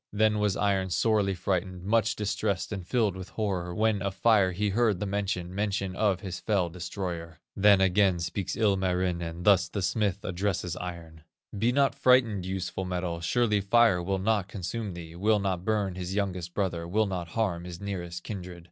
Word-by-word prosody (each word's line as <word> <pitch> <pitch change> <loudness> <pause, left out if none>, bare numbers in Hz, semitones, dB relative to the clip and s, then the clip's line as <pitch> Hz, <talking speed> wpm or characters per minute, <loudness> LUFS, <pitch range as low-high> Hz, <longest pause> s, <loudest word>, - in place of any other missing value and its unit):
"Then 105 0 +2
was 105 -2 +1
Iron 95 -2 +1
sorely 100 +1 +2
frightened, 90 0 -2
Much 110 +2 +2
distressed 100 -1 -2
and 95 -4 -5
filled 110 -4 +1
with 95 0 -8
horror, 90 -5 -2
When 110 -1 +1
of 100 0 -2
Fire 100 -3 +4
he 100 +3 -1
heard 105 -2 +2
the 105 - -2
mention, 95 -3 -2
Mention 100 -2 -2
of 100 -3 +1
his 95 -2 -5
fell 100 -5 0
destroyer. 85 -2 -5 0.2
"Then 100 -1 +5
again 95 -1 +3
speaks 85 +3 -3
Ilmarinen, 90 -4 0
Thus 95 -2 +4
the 100 +1 -3
smith 100 0 0
addresses 90 -1 -2
Iron: 85 -3 -7 0.3
'Be 115 +4 +2
not 140 +1 +3
frightened, 115 -8 +3
useful 95 0 -3
metal, 90 -2 -3
Surely 105 +4 +1
Fire 100 -2 +4
will 95 +2 -1
not 100 0 +1
consume 100 +1 -5
thee, 85 -1 -9
Will 105 +4 +2
not 95 -3 -1
burn 105 -3 0
his 90 +1 -5
youngest 90 -4 -2
brother, 85 -4 -1
Will 110 +5 +2
not 90 -4 -3
harm 90 -3 -1
his 90 -1 -7
nearest 85 -4 -5
kindred. 90 -4 -7
95 Hz, 175 wpm, -28 LUFS, 90-105 Hz, 0.3 s, Then